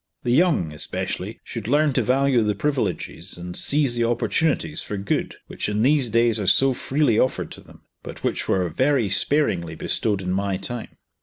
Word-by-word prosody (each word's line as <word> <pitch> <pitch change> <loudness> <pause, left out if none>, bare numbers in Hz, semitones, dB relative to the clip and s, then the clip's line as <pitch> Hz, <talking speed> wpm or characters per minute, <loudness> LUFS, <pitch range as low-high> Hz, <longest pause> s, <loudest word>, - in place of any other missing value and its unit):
The 120 - 0
young, 145 - +2
especially, 75 - -4
should 105 - -7
learn 145 +2 +3
to 125 - +2
value 130 +1 +2
the 105 -1 0
privileges 100 - -2
and 90 0 -7
seize 140 +1 +2
the 120 - +1
opportunities 120 - +1
for 105 - -5
good 100 0 -2
which - - -4
in 105 +1 0
these 135 -2 +4
days 115 0 +3
are 100 - -3
so 135 +6 +4
freely 130 -3 +1
offered 130 - 0
to - - -9
them, - - -18 0.2
but - - -10
which - - -1
were 90 -2 +1
very 125 - +1
sparingly 95 - +1
bestowed 100 -3 -1
in 90 - -2
my 95 0 -1
time. 120 +2 -7
115 Hz, 180 wpm, -23 LUFS, 95-135 Hz, 0.2 s, these